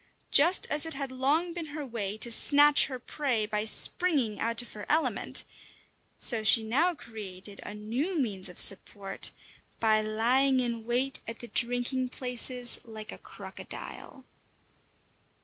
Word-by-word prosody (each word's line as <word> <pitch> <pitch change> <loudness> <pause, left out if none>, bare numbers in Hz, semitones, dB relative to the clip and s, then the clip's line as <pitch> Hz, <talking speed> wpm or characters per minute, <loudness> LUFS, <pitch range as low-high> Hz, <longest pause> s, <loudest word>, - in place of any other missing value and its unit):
Just 340 +6 +5
as 300 +2 +1
it 325 - -5
had 275 -1 -5
long 295 +7 0
been 335 -2 -6
her 295 - -5
way 215 -5 -5
to 235 +2 -3
snatch 290 +4 +6
her 260 -2 -6
prey 250 -3 -2
by 210 0 -3
springing 270 - +2
out 230 +1 +1
of - - -14
her 210 -1 -9
element, 315 +2 +1 0.7
so 230 -3 +3
she 220 +1 +4
now 305 +11 +1
created 205 -6 -10
a 205 - -8
new 245 - -3
means 200 -9 -2
of 180 - -9
support 195 0 +3 0.5
by 215 -1 +3
lying 245 +5 +1
in 235 -2 -3
wait 255 +3 -1
at 230 0 -6
the 240 - -10
drinking 245 +3 0
places 250 -1 -2
like 220 -2 -9
a - - -11
crocodile. 265 - -10
240 Hz, 150 wpm, -28 LUFS, 215-275 Hz, 0.7 s, snatch